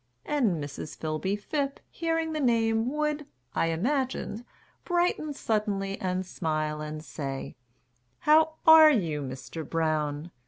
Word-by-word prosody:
And 265 -10 +2
Mrs. 145 -1 -6
Philby 160 +6 -2
Phipp, 280 +4 -2
hearing 325 -1 -1
the 310 - -2
name, 230 -2 +2
Would, 300 -1 -1 0.3
I - - +1
imagined, 245 - -1 0.4
brighten 345 -3 +1
suddenly 210 -6 -1
And 185 0 -1
smile 155 -3 -2
and 155 0 -6
say, 135 -4 -5 0.7
"How 315 +1 +5
are 320 -1 +10
you, 170 - +1
Mr. 130 +4 -6
Brown?" 155 0 -1
205 Hz, 120 wpm, -28 LUFS, -, 0.7 s, are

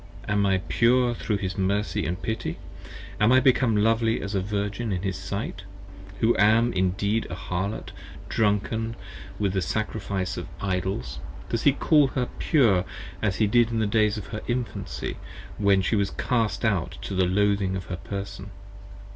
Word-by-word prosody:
am 100 -1 +2
I 95 -1 +3
pure 120 0 +3
thro' 110 -2 -2
his 95 0 -4
Mercy 100 +2 0
And 90 +1 -3
Pity? 110 +3 -3 0.6
Am 105 +2 +4
I 130 - +7
become 125 -4 +3
lovely 115 +1 +2
as 100 +1 -5
a 95 - +1
Virgin 105 +3 -2
in 90 -1 -2
his 95 -2 -1
sight, - - -4 0.6
Who 115 +1 +4
am 115 +4 +4
Indeed 100 +4 0
a 90 - -4
Harlot 95 +4 -3 0.4
drunken 110 +2 0 0.4
with 100 -3 0
the 95 - +1
Sacrifice 100 -2 -2
of - - -5
Idols, 90 -10 -2 0.3
does 115 - -1
he 145 - +5
Call 150 0 +4
her 125 -1 -2
pure 115 - +4 0.4
as 105 -4 +1
he 110 - +2
did 120 +2 +4
in 115 - -2
the 110 - +2
days 105 0 +2
of 105 - -6
her 105 0 -5
Infancy, 105 -7 -3 0.4
when 100 -2 +4
She - - 0
40 - - +3
Was 100 -1 +1
cast 110 -4 0
out 100 -6 0
to - - -4
the 95 -1 +3
loathing 100 0 +2
of 95 -2 -5
her 90 0 -5
person? 100 +1 -6
105 Hz, 170 wpm, -26 LUFS, 95-115 Hz, 0.6 s, I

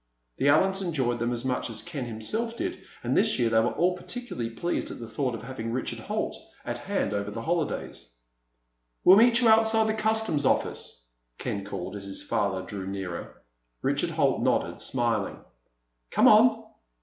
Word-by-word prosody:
The 140 - +3
Allens 190 +6 +3
enjoyed 135 -10 -1
them 120 +1 0
as 120 +1 -2
much 125 -1 -1
as 110 -1 -4
Ken 150 -7 -5
himself 215 - -3
did, 360 0 -3 0.2
and - - 0
this - - +3
year 115 -2 +1
they 110 - +5
were 115 +2 +2
all 180 +1 +2
particularly 210 - -5
pleased 170 +10 -2
at - - -7
the 115 - -7
thought 125 0 -2
of - - -8
having 115 -4 -5
Richard 130 +2 -3
Holt - - -3 0.3
at - - -4
hand - - -1
over 100 0 -2
the 115 +2 -6
holidays. 160 - -3 0.9
"We'll 185 +2 +8
meet 235 +2 +6
you 240 - +4
outside 220 0 +5
the 220 - +1
customs 220 -8 +1
office," 95 - -1 0.3
Ken 100 - -3
called, 95 -1 -6
as 100 -1 -6
his 100 0 -4
father 100 -3 -1
drew 95 0 -6
nearer. 95 -3 -6 0.4
Richard - - +1
Holt - - +1
nodded, - - 0
smiling. 115 -5 0 0.7
"Come - - +4
on!" - - +6
125 Hz, 175 wpm, -27 LUFS, -, 0.9 s, We'll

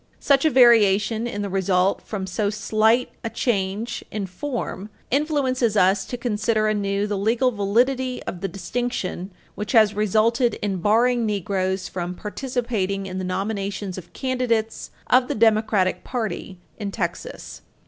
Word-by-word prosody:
Such 280 +1 +3
a - - +6
variation 225 -3 +4
in 205 -3 -4
the - - -2
result 190 0 +1
from 200 -3 -5
so 200 +2 -1
slight 215 +3 +2
a 230 - -2
change 215 0 -2
in 210 -2 -3
form 210 -1 -5 0.2
influences 260 -6 +1
us 190 +1 +3
to 245 - -5
consider 215 -2 0
anew 200 -1 0
the 205 -2 -2
legal 230 +5 +2
validity 250 +5 0
of 175 - -6
the 195 - -1
distinction 195 0 -3 0.2
which 210 +3 -5
has 215 -3 +5
resulted 220 +4 +2
in 195 -2 -1
barring 235 +6 +3
Negroes 190 -2 -1
from 180 0 -4
participating 210 -3 -2
in 185 0 -5
the - - -3
nominations 195 0 -3
of 185 - -10
candidates 245 -4 -1 0.2
of 250 0 +4
the - - -2
Democratic 215 -4 +2
party 215 -6 -4 0.2
in 205 -2 -3
Texas. - - -5
215 Hz, 145 wpm, -23 LUFS, 195-240 Hz, 0.2 s, a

